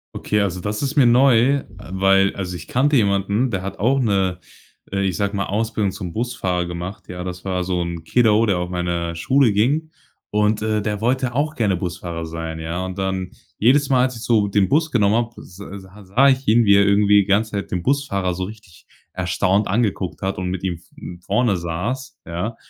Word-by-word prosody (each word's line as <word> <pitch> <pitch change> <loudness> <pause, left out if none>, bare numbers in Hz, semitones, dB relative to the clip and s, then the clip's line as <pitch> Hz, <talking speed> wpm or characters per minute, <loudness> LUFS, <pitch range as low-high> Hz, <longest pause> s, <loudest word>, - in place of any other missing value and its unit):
Okay, 105 0 0
also 95 -2 -2
das 105 +4 -3
ist 140 +2 -2
mir 135 -5 +5
neu, 130 +2 +4 0.2
weil 95 0 +2
also 90 -2 -4
ich - - -9
kannte 140 +4 +2
jemanden, 100 +2 +2
der 95 -4 -3
hat 95 - -6
auch 135 +6 +2
'ne, 95 -6 +1 0.5
äh, 100 0 -1
ich 95 -3 -1
sage 100 0 -1
mal 100 - -1
Ausbildung 105 -1 -1
zum 95 -3 -7
Busfahrer 100 -7 -2
gemacht. 85 +3 -7
Ja, 90 0 -6
das 90 -1 -6
war 90 -1 -1
so 90 -1 -1
'n 85 -1 -4
Kiddo, 110 +5 +3
der 95 -5 +1
auf 90 - -3
meine 85 -1 -2
Schule 125 +9 +3
ging 140 +10 +1 0.4
und, 105 0 +1
äh, 110 -1 0
der 105 -1 -2
wollte 125 +1 0
auch 150 +4 -1
gerne 105 -7 +1
Busfahrer 85 -2 -5
sein. 80 0 -5
Ja, 85 +3 -3
und 95 +1 -6
dann 95 -1 -2 0.3
jedes 140 +5 +3
Mal, 130 -2 +4
als 130 -1 -1
ich 115 - -9
so 110 -4 +2
den 100 -1 +1
Bus 155 +3 +2
genommen 105 -3 +3
habe, 115 0 -2
s 90 - -14
sa 100 0 -10
sah 120 +9 +4
ich 135 0 0
ihn, 115 +2 +5
wie 100 -2 +5
er 100 0 +5
irgendwie 100 0 +5
die - - -3
ganze 105 +2 +1
Zeit 100 -4 -4
den 90 - -1
Busfahrer 100 -9 0
so 95 - -3
richtig 100 -4 -11 0.3
erstaunt 95 +3 +1
angeguckt 100 -3 -1
hat 95 0 -2
und 90 -1 -3
mit 95 -1 -4
ihm, 90 -3 -2 0.2
hm, 85 0 -9
vorne 105 +1 +1
saß, 90 +11 -4
ja? 90 +7 -3
100 Hz, 210 wpm, -21 LUFS, 90-115 Hz, 0.5 s, mir